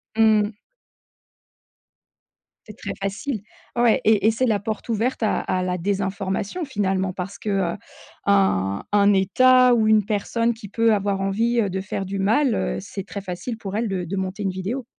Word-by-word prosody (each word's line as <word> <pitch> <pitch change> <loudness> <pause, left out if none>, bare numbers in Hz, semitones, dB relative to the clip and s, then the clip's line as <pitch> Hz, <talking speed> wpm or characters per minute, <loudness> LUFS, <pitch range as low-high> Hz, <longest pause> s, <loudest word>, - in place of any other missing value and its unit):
Mmh 220 -1 +5
mh. 210 +1 -5 2.1
C'est 210 - -10
très - - -5
facile. 200 +4 -3 0.3
Ouais 240 -2 +3
et 215 -2 +4
et - - +5
c'est 225 +4 0
la 215 -3 +2
porte 220 +3 -5
ouverte 235 +4 -1
à 215 - +1
à 185 - -1
la 180 0 -1
désinformation, 195 - -2
finalement, 195 -6 -1
parce 195 +2 -6
que, 215 - -5 0.2
heu, - - -7 0.5
un 100 - +2
un 205 0 +5
état 250 +6 +5
ou 220 -2 +2
une 215 -1 +5
personne 230 +3 0
qui 225 -2 -10
peut 230 +2 +2
avoir 200 -1 0
envie, 225 +5 +1
heu, 205 - 0
de 190 +1 -3
faire 195 0 -4
du 195 +1 -4
mal, 225 +5 +2
heu, - - -1
c'est 195 0 -7
très 200 0 -6
facile 195 +5 -5
pour 200 -3 -6
elle 225 +2 0
de 190 -3 -2
de 180 +4 -4
monter 190 +1 -3
une 195 - 0
vidéo. 200 +8 -4
205 Hz, 185 wpm, -23 LUFS, 195-225 Hz, 2.1 s, Mmh